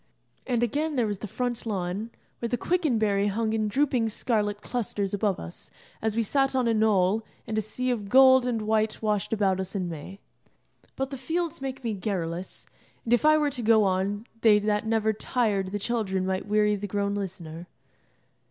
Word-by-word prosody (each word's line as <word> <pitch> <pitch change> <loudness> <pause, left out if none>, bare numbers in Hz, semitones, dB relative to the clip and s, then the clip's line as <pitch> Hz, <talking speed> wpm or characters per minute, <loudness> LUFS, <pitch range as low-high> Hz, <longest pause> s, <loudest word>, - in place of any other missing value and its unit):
And 240 -2 +1
again, 295 +6 -1
there 245 -3 +2
was 205 -2 -3
the 215 - -5
front 245 +3 -3
lawn, 200 0 -3 0.3
where 235 - -2
the 245 - 0
quicken 330 -8 +1
berry 205 -2 +2
hung 220 +2 0
in 215 -1 0
drooping 250 -1 +1
scarlet 210 -2 -1
clusters 210 -5 -2
above 205 -2 0
us, 85 +1 -9 0.3
as 220 -1 -1
we 230 - +2
sat 270 +4 +1
on 255 -2 +2
a 230 - +3
knoll, 215 -1 +2 0.2
and 220 - -4
a 215 - +2
sea 250 +4 -2
of 210 -5 -3
gold 260 +1 +7
and 230 -3 -1
white 215 0 +1
washed 210 -2 0
about 195 -4 +1
us 190 +2 -5
in 185 -2 -1
May. 170 +4 -8 0.8
But 270 0 -3
the 270 - -4
fields 325 +4 -2
make 270 -1 -5
me 230 -2 -1
garrulous, 185 -3 -4 0.4
and 235 - 0
if 240 - +3
I 310 0 +6
were 295 -1 +1
to 255 -3 -4
go 220 -1 +5
on 195 +3 0 0.2
they 215 -2 +6
that 210 +1 0
never 220 -1 +2
tired 210 -4 0
the 200 +2 -3
children 200 -4 -1
might 190 +1 -2
weary 210 0 +3
the 205 0 -4
grown 200 0 -1
listener. 175 -4 -6
215 Hz, 195 wpm, -27 LUFS, 200-240 Hz, 0.8 s, gold